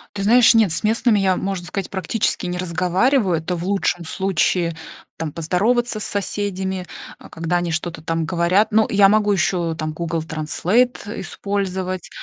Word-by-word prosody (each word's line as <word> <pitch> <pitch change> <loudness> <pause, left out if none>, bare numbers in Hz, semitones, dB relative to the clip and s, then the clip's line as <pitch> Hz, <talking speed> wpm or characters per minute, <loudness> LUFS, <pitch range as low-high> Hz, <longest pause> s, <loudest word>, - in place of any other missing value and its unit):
Ты 200 - -3
знаешь, 235 +3 +6
нет, 220 -6 +4
с 165 - -1
местными 220 0 +2
я, 190 -1 +2
можно 190 -2 -3
сказать, 195 -3 -4
практически 190 +1 -1
не 180 0 -3
разговариваю. 180 - +1
Это 175 +3 -3
в 170 - -5
лучшем 185 -3 -1
случае, 175 -1 0 0.4
там, 160 -2 -4
поздороваться 215 +9 0
с - - -3
соседями, 190 -2 -3 0.3
а, - - -14
когда 165 +2 -2
они 175 -1 -2
что-то 165 0 -3
там 165 0 -1
говорят. 180 +5 +2
Ну, 220 +1 +3
я 200 -1 +5
могу 210 0 +3
ещё 175 -3 0
там 155 -1 -4
Google 165 0 -3
Translate 195 +9 -1
использовать, 190 -2 -3
185 Hz, 160 wpm, -20 LUFS, 170-205 Hz, 0.4 s, знаешь